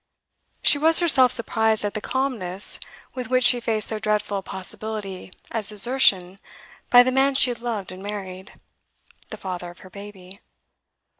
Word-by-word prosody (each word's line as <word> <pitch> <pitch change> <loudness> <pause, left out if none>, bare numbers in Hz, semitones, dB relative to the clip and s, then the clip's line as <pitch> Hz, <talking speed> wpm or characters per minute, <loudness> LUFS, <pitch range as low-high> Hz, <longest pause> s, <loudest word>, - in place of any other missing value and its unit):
She 290 - +5
was 320 +2 +4
herself 265 -8 +5
surprised 220 -2 0
at 205 - -3
the 215 - -5
calmness 220 -9 -2 0.3
with 255 -1 -6
which 255 0 +2
she 245 0 +4
faced 220 -3 0
so 220 - +1
dreadful 210 -1 -1
a - - -8
possibility 195 0 -6 0.2
as 220 -2 -3
desertion 200 -4 +1 0.5
by 245 -1 +8
the 255 - 0
man 270 +1 +2
she 260 -2 +4
had 235 - -8
loved 220 -6 -4
and 185 0 -10
married, 195 -2 -7 0.8
the - - -7
father 180 -2 -6
of 175 - -15
her 185 - -14
baby. 200 -1 -12
215 Hz, 160 wpm, -23 LUFS, 190-250 Hz, 0.8 s, by